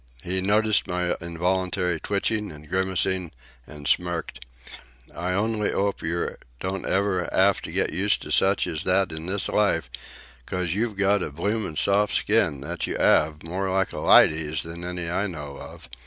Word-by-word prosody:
He 95 +1 -1
noticed 105 +2 +2
my 90 -1 0
involuntary 90 +1 -1
twitching 105 +2 -1
and 75 0 -13
grimacing, 95 -1 0 0.4
and 75 -1 -8
smirked: 85 0 -1 0.7
"I 90 +2 -2
only 105 +2 0
'ope 100 0 -1
yer 85 +1 -2 0.2
don't 95 0 -3
ever 95 -2 0
'ave 100 +1 +4
to - - -7
get - - 0
used - - +1
to - - -8
such 95 +1 +3
as 80 - -3
that 95 -1 +2
in 80 +2 -6
this 95 +1 -1
life, 85 -10 +1 0.6
'cos 90 -2 -2
you've 110 0 -2
got 100 0 +3
a - - -2
bloomin' 95 +3 -2
soft 100 +5 +3
skin, 85 -11 +2
that 70 - -4
you - - -3
'ave, 75 +1 +2
more 95 +3 -2
like 95 0 0
a - - -4
lydy's 80 -1 +4
than 85 +1 -8
any 90 -1 -4
I 95 +4 0
know 75 -6 -7
of. - - -10
90 Hz, 170 wpm, -25 LUFS, 85-100 Hz, 0.7 s, ave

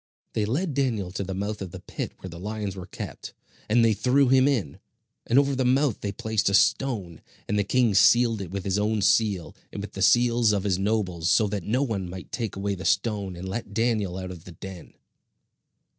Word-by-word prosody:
They 110 - 0
led 150 - -1
Daniel 115 -9 -1
to 100 - -3
the 95 0 -5
mouth 105 +2 -3
of 95 - -4
the - - -9
pit - - -6
where 95 - -8
the 85 - -9
lions 105 0 -4
were 90 -2 -8
kept, - - -8 0.3
and 115 +2 +4
they 110 - +4
threw 125 +6 +3
him 130 +1 +5
in; 115 - -1 0.5
and 120 - +3
over 140 0 +4
the 130 - 0
mouth 130 -1 +2
they 100 - -2
placed 110 0 0
a 100 - +3
stone; 105 - +1 0.3
and 105 - -1
the - - +3
king 120 +1 +2
sealed 115 +3 +5
it 95 - -6
with 95 +1 -4
his 100 +1 0
own 105 0 0
seal, 100 -7 +2 0.2
and - - -6
with 100 0 -7
the 95 - -6
seals 115 +2 +4
of 100 -2 0
his 95 -3 0
nobles; 95 -5 0
so 110 - +4
that 100 -3 -4
no 125 +6 +1
one 100 -8 -3
might 90 +1 -9
take 115 -4 -3
away 100 +1 -2
the 95 -1 -6
stone 100 -5 0
and 90 +2 -7
let 100 +1 -5
Daniel 110 -5 0
out 95 -1 -5
of 85 -3 -10
the 90 - -10
den. 90 0 -10
105 Hz, 220 wpm, -26 LUFS, 95-115 Hz, 0.5 s, him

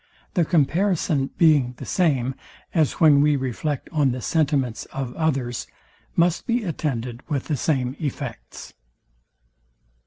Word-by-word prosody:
The 175 -5 +2
comparison 160 -3 +1
being 145 -7 +4
the - - -8
same, 135 -8 +1 0.4
as 155 -4 +2
when 150 -4 +5
we 150 0 +4
reflect 135 +2 -3
on 150 -5 +2
the 125 - -3
sentiments 140 -4 0
of 135 -2 -5
others, 135 -7 -1 0.5
must 170 0 +2
be 240 -1 +1
attended 125 - -3
with 140 -4 -1
the 150 - -1
same 130 -2 0
effects. 140 -6 -6
145 Hz, 125 wpm, -23 LUFS, 130-160 Hz, 0.5 s, when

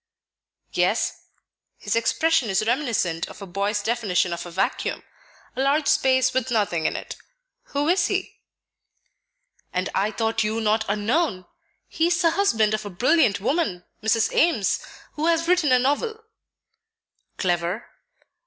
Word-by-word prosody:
"Yes; - - 0 0.5
his - - -2
expression 270 +3 +2
is 195 +2 +1
reminiscent 225 - 0
of - - -12
a 200 - -7
boy's 200 +3 -2
definition 205 -6 0
of 170 +1 -6
a - - -8
vacuum, 175 +3 -2 0.5
a - - -1
large 285 +3 +2
space 260 -1 +3
with 260 -1 0
nothing 200 -9 0
in - - -2
it. - - -6 0.5
Who 285 +1 -2
is 345 0 +3
he?" 385 -1 -3 1.3
"And 185 0 -2
I 200 +2 +1
thought 225 0 -1
you 215 +1 -1
not 220 0 +1
unknown! 210 - 0 0.4
He 325 - 0
is 350 0 +1
the 335 -3 +3
husband 225 - +2
of 215 0 -1
a 205 - -6
brilliant 245 - +2
woman, 210 - -1 0.2
Mrs. 220 +1 +1
Ames, 270 - +2 0.3
who 310 +2 -1
has 330 0 +2
written 350 -6 +3
a 255 - +6
novel." 435 - -1 1.1
"Clever?" 175 +3 -1
225 Hz, 145 wpm, -24 LUFS, 200-305 Hz, 1.3 s, a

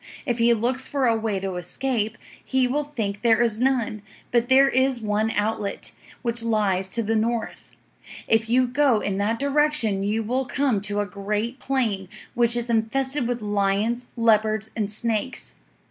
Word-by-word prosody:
If 240 -3 -1
he 235 +1 +4
looks 250 +4 0
for 275 -2 0
a 230 -2 +3
way 220 -3 -1
to 190 -2 -3
escape, 220 +4 -2 0.3
he 260 -1 +1
will 290 +4 0
think 215 -8 -4
there 230 -2 +4
is 230 -2 +2
none; 245 -5 0 0.3
but 240 0 +2
there 270 +1 +6
is 260 -1 +2
one 215 0 0
outlet, 210 -1 -2 0.3
which 235 -1 -1
lies 205 -5 +1
to 230 - 0
the 225 +1 0
north. 225 +1 -2 0.6
If 225 0 +2
you 255 +2 +4
go 255 -2 +2
in 195 -1 -2
that 215 +3 0
direction 280 -7 +1
you 210 +3 0
will 255 +4 -1
come 265 -6 0
to 205 0 -1
a - - -1
great 210 +6 -3
plain, 220 -9 -1 0.2
which 240 0 +2
is 240 0 -2
infested 250 +4 0
with 240 -2 -3
lions, 210 +4 0
leopards, 220 -1 +2
and 210 -2 -2
snakes. 230 +3 -3
230 Hz, 170 wpm, -24 LUFS, 210-250 Hz, 0.6 s, there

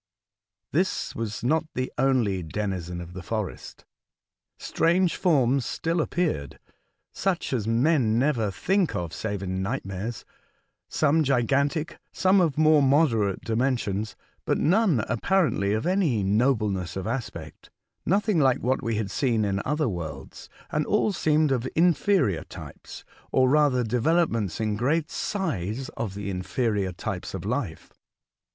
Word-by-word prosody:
This 180 +5 0
was 110 -1 -4
not 160 +6 +2
the 130 0 -2
only 120 -8 +1
denizen 90 0 -4
of 85 0 -9
the 95 - -7
forest. 105 +1 -5 0.7
Strange 175 +1 +1
forms 135 -7 +2
still 165 +5 -1
appeared, 155 - -2 0.6
such 185 -7 -1
as 110 -4 -1
men 120 -1 +2
never 120 -5 +1
think 185 - 0
of 85 -3 -3
save 100 -3 -4
in 95 0 -2
nightmares: 105 0 -4 0.6
some 155 +1 +2
gigantic, 140 +4 0
some 190 +1 +3
of 160 -6 +1
more 155 -1 +5
moderate 130 - +2
dimensions, 110 -4 -1 0.3
but - - 0
none 180 - +3
apparently 130 - +1
of 110 +2 -1
any 170 - +1
nobleness 105 -4 +1
of 95 -1 -4
aspect; 110 - -6 0.3
nothing 200 0 +2
like 135 -3 +4
what 130 +2 +1
we 115 -3 -1
had 105 -2 -2
seen 115 -6 +1
in 100 0 -1
other 150 +1 0
worlds, 80 - -6 0.2
and 150 0 0
all 210 0 +2
seemed 155 -3 +2
of 130 -1 0
inferior 165 - +2
types, - - -11 0.3
or 130 0 +4
rather 140 -3 +3
developments 120 - +1
in 110 -2 0
great 150 +8 0
size 135 - -3
of 105 -5 -5
the 100 -1 -4
inferior 95 +1 -1
types 85 - -5
of - - -6
life. - - -3
125 Hz, 135 wpm, -26 LUFS, 100-155 Hz, 0.7 s, more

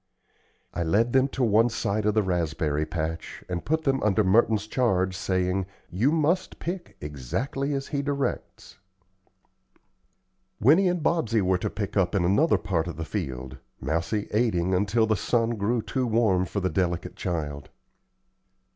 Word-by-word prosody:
I - - -3
led 105 +9 +2
them 130 0 +4
to 135 -1 -2
one 115 +1 +4
side 105 -2 -1
of 105 - +1
the 110 - +3
raspberry 80 -4 -1
patch 80 -1 -4
and 90 -1 -3
put 160 +1 0
them 135 -2 +1
under 105 0 +2
Merton's 105 +2 +3
charge 95 -6 +1
saying, 95 0 0 0.2
"You 110 - +2
must 165 +4 +1
pick 175 +1 -6
exactly 115 - -3
as 135 0 -4
he 140 -2 -1
directs." 140 -1 -4 1.8
Winnie 160 - +5
and 175 -3 0
Bobsey 115 - +1
were 90 0 +2
to - - -2
pick 100 -1 -5
in 95 -1 +2
another 120 - +3
part 85 -4 -1
of 85 - -6
the 80 - -4
field, 65 -2 -5 0.2
Mousie 85 +9 -1
aiding 100 -5 +1
until 105 +4 +2
the 110 0 +1
sun 115 +3 +1
grew 115 +1 0
too 130 -2 -1
warm 110 -5 +2
for 100 - -3
the 95 -1 0
delicate 85 0 -1
child. 75 -5 -4
100 Hz, 155 wpm, -26 LUFS, 90-120 Hz, 1.8 s, Winnie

